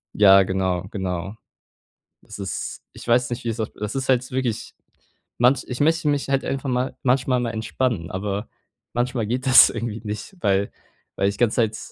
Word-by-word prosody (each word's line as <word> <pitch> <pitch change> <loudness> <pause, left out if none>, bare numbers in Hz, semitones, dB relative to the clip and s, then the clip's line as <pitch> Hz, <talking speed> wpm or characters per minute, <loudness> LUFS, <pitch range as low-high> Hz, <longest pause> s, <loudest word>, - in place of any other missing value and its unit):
Ja, 100 -1 +7
genau, 95 -1 -1
genau. 95 0 -4 0.9
Das - - -11
ist 100 -1 -5
ich - - -12
weiß 120 +1 +3
nicht, 120 +1 -4
wie's 115 -1 -2
auf 110 - -2
das 105 +2 -5
ist 135 -1 -3
halt 125 -1 +1
wirklich 125 -4 -3 0.6
manch 125 +2 +3
ich 125 +2 -4
möchte 160 +1 +2
mich 145 -2 0
halt 135 -1 +1
einfach 135 0 -3
mal 125 +1 -1
manchmal 130 0 +2
mal 120 - -1
entspannen, 110 -5 -2
aber 100 +3 -3 0.5
manchmal 120 -2 -1
geht 125 +4 -2
das 130 - +9
irgendwie 115 -1 -4
nicht, 105 - -6
weil 100 - +1 0.5
weil 100 - +2
ich 100 0 -2
ganze 120 -3 +2
Zeit 110 -2 +1
115 Hz, 175 wpm, -23 LUFS, 100-130 Hz, 0.9 s, das